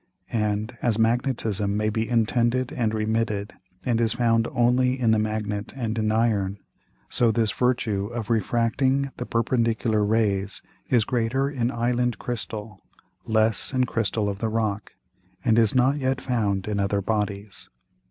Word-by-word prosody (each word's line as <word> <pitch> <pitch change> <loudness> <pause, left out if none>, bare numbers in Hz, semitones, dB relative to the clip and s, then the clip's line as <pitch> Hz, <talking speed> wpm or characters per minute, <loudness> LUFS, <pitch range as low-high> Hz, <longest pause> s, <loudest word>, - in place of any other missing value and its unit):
And 105 0 -1
as 115 -3 +1
Magnetism 110 -3 0
may 105 0 +1
be 110 +2 -2
intended 120 +2 +1
and 115 -3 0
remitted, 110 -1 -1 0.3
and 120 -2 +1
is 115 -2 +3
found 115 -1 +2
only 125 +1 +2
in 115 -3 +3
the 110 - +3
Magnet 105 -1 -2
and 115 -4 -2
in 110 0 +1
Iron: 105 -4 +1 0.5
So 120 - +3
this 110 -1 +1
Virtue 115 -5 0
of 120 -1 -4
refracting 120 +5 +1
the 125 - -5
perpendicular 115 -2 +1
Rays 100 -2 0 0.3
is 120 -4 +3
greater 130 +3 0
in 120 -4 0
Island 120 0 0
Crystal, 110 -4 -5 0.5
less 110 +3 +1
in 130 -1 +3
Crystal 110 -3 -1
of 100 -1 -3
the 110 - -1
Rock, 110 -2 -2 0.5
and 115 -1 +4
is 110 0 +2
not 130 +3 +3
yet 130 -2 0
found 105 -7 -1
in 105 -1 -1
other 100 0 0
Bodies. 105 -1 -2
115 Hz, 150 wpm, -25 LUFS, 105-120 Hz, 0.5 s, and